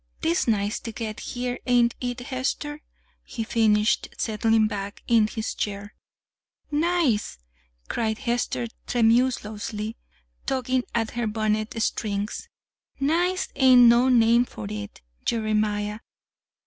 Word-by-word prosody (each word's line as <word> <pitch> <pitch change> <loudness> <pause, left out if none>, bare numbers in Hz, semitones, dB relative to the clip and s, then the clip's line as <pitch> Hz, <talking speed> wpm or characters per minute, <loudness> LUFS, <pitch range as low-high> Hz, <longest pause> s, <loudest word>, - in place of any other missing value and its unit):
'Tis 330 -2 +1
nice 210 -1 +1
ter 230 - -6
get 220 -1 -5
here; 245 0 -4
ain't 240 -1 +4
it, 245 -1 -3
Hester?" 275 +3 -3 0.4
he 230 - -5
finished, 220 -1 +2
settling 220 0 +2
back 205 -1 -5
in 225 -2 +4
his 220 0 -4
chair. 205 0 -4 0.8
"'Nice'!" 300 - +1 0.5
cried 220 -2 -1
Hester 240 -1 -1 0.2
tremulously, 225 -2 0 0.5
tugging 255 -1 0
at 225 -1 0
her 240 -2 -2
bonnet 215 +1 -1
strings. 205 -2 -2 0.5
"'Nice' 350 +6 +1
ain't 255 -2 +7
no 240 +2 +6
name 235 -1 +5
for 110 - -8
it, 105 -1 -7 0.2
Jeremiah. 215 -1 0
230 Hz, 110 wpm, -25 LUFS, 215-250 Hz, 0.8 s, ain't